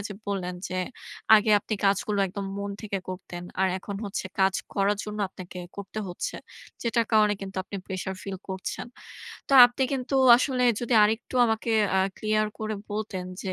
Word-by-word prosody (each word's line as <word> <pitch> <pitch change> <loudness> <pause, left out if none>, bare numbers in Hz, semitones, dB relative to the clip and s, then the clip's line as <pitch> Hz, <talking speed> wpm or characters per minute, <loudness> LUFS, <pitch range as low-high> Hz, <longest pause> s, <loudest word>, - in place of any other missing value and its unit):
যে 205 - -7
বললেন 180 -2 -2
যে, 185 - -3 0.6
আগে 215 0 +4
আপনি 215 - -3
কাজগুলো 200 +1 +1
একদম 195 +1 -5
মন 200 0 -3
থেকে 200 -2 -3
করতেন 180 -1 -7 0.2
আর 190 - +4
এখন 200 +1 -6
হচ্ছে 200 -1 -4
কাজ 190 0 +4 0.2
করার 200 +1 +2
জন্য 210 0 -6
আপনাকে 185 -1 -10 0.2
করতে 200 +2 -6
হচ্ছে, 175 - -4 0.5
যেটার 230 -1 +1
কারণে 210 -1 +5
কিন্তু 195 -1 -7
আপনি 200 - -6
pressue 190 0 -4
feel 195 -1 -4
করছেন। 190 +4 -4 0.6
তো - - -2
আপনি 245 +2 -3
কিন্তু 265 +1 -2 0.2
আসলে 255 -1 +1 0.2
যদি 240 0 0
আরেকটু 225 +4 -1
আমাকে 225 +1 -1 0.3
আ - - +4 0.2
clear 215 0 +1
করে 215 0 -3 0.2
বলতেন 205 -3 -3 0.2
যে 190 -2 -3
205 Hz, 170 wpm, -26 LUFS, 190-220 Hz, 0.6 s, কারণে